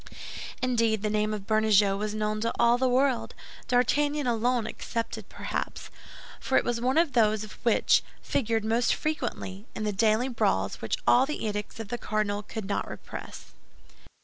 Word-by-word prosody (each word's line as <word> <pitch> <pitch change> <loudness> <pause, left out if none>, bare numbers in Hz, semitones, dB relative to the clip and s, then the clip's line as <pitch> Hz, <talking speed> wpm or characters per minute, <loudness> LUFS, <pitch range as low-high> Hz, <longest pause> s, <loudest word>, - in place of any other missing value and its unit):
Indeed, 230 -4 +2
the 210 - 0
name 215 0 +1
of 210 -2 -4
Bernajoux 215 -2 +4
was 210 +1 -3
known 215 0 -1
to 230 - 0
all 235 +1 +4
the 260 0 +2
world, 260 0 +1 0.3
D'Artagnan 290 +4 +2
alone 240 0 +1
excepted, 230 +1 -4
perhaps; - - -5 0.5
for 265 - +1
it - - +3
was 240 -1 -1
one 255 +4 +1
of 330 -4 +3
those 215 -3 +3 0.2
which 235 - +4 0.2
figured 225 -3 -1
most 230 +2 +2
frequently 210 -9 -4
in 215 - -3
the 210 -1 -1
daily 220 +4 +2
brawls 245 -3 0
which - - -1
all 255 +2 +5
the 300 -5 -3
edicts 210 +1 -4
of 220 -3 -6
the 240 - -3
cardinal 210 -2 -1
could 215 0 -6
not 200 - -2
repress. - - -9
225 Hz, 165 wpm, -28 LUFS, 215-245 Hz, 0.5 s, all